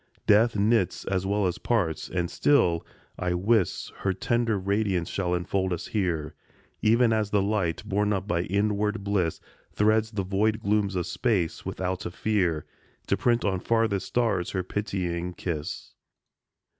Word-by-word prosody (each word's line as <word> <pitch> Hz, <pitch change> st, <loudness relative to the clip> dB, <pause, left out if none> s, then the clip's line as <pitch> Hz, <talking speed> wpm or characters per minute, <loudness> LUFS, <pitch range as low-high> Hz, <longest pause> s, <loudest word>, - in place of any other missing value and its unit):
Death 110 Hz, +2 st, +5 dB
knits 105 Hz, -2 st, +1 dB
as 95 Hz, -1 st, -1 dB
well 100 Hz, 0 st, +1 dB
as 90 Hz, -, -1 dB
parts, 90 Hz, -10 st, 0 dB
and 90 Hz, -1 st, -2 dB
still, 90 Hz, -, +3 dB, 0.4 s
I 90 Hz, -1 st, 0 dB
wis, 100 Hz, +1 st, +1 dB
Her 95 Hz, -, 0 dB
tender 115 Hz, +3 st, 0 dB
radiance 100 Hz, -2 st, 0 dB
shall 90 Hz, -2 st, -1 dB
enfold 95 Hz, +2 st, -1 dB
us 85 Hz, -1 st, -3 dB
here, 85 Hz, -7 st, -1 dB, 0.5 s
Even 115 Hz, +1 st, +4 dB
as 110 Hz, -2 st, 0 dB
the 105 Hz, -, +2 dB
light, 100 Hz, -5 st, -1 dB
borne 105 Hz, +1 st, +1 dB
up 95 Hz, -1 st, -1 dB
by 85 Hz, -4 st, +1 dB
inward 105 Hz, +1 st, 0 dB
bliss, 100 Hz, -5 st, 0 dB, 0.3 s
Threads 110 Hz, +1 st, +3 dB
the 105 Hz, -3 st, -2 dB
void 105 Hz, +3 st, +1 dB
glooms 105 Hz, -2 st, 0 dB
of 90 Hz, -2 st, -1 dB
space 100 Hz, -10 st, -1 dB
without 90 Hz, -1 st, -3 dB
a -, -, -4 dB
fear, 90 Hz, -5 st, 0 dB, 0.4 s
To -, -, +1 dB
print 120 Hz, 0 st, +1 dB
on 95 Hz, -2 st, +1 dB
farthest 115 Hz, -2 st, +1 dB
stars 115 Hz, -7 st, 0 dB
her 95 Hz, -2 st, -2 dB
pitying 90 Hz, -3 st, -3 dB
kiss. 80 Hz, -4 st, -5 dB
100 Hz, 155 wpm, -27 LUFS, 90-110 Hz, 0.5 s, Death